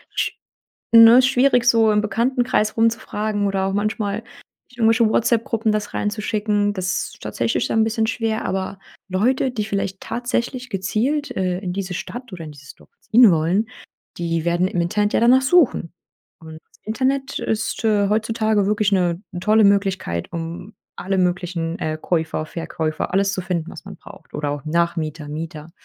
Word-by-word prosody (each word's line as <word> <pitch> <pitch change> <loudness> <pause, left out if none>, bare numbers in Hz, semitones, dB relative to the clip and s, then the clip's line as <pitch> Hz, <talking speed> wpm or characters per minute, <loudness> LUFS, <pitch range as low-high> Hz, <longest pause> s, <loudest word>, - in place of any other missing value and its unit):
sch - - 0 0.6
ne, 230 +2 +9
schwierig, 255 -1 +3
so 230 -2 +4
im 210 - +3
Bekanntenkreis 235 +1 0
rumzufragen 215 -2 0
oder 195 -1 -1
auch 195 - -1
manchmal 205 0 -1 0.5
in 250 - -20
irgendwelche 225 0 +4
WhatsApp-Gruppen 225 0 +1
das 210 -1 -3
reinzuschicken. 210 -1 -1
Das 185 -2 -2
ist - - -22
tatsächlich 115 +2 -1
dann 225 - +1
'n - - +4
bisschen 220 0 0
schwer, 225 -1 -2
aber 190 +1 -3 0.3
Leute, 245 +8 +1
die 215 -4 -2
vielleicht 195 -2 -3
tatsächlich 245 +1 -3
gezielt, 225 +10 -1
äh, 185 -1 -1
in 185 -3 -4
diese 190 -2 -4
Stadt 245 +6 -7
oder 175 -3 -7
in 155 - -9
dieses 145 -1 -14
Dorf - - -21
ziehen 230 -1 +6
wollen, 175 +7 +1 0.5
die 165 -1 -1
werden 175 +2 +1
im 180 - -2
Internet 205 +5 0
ja - - +3
danach 250 +3 +5
suchen. 265 - +3 0.5
Und 160 -1 -11
das - - -28
Internet 265 +4 -1
ist, 220 +2 -2
äh, 205 -2 +2
heutzutage 215 -1 +1
wirklich 210 0 +1
'ne 175 -2 +1 0.2
tolle 215 +3 +4
Möglichkeit, 195 - 0
um 170 +4 -6 0.2
alle 190 +1 -2
möglichen, 175 -2 -1
äh, 155 0 -2
Käufer, 160 -2 -1
Verkäufer 160 -1 -4
alles 195 0 +2
zu 195 - -2
finden, 175 -3 -3
was - - -11
man - - -9
braucht - - -15
oder 150 -1 -2
auch 145 0 -5
Nachmieter, 160 -2 -1
Mieter. 155 +1 -7
205 Hz, 165 wpm, -21 LUFS, 175-225 Hz, 0.6 s, ne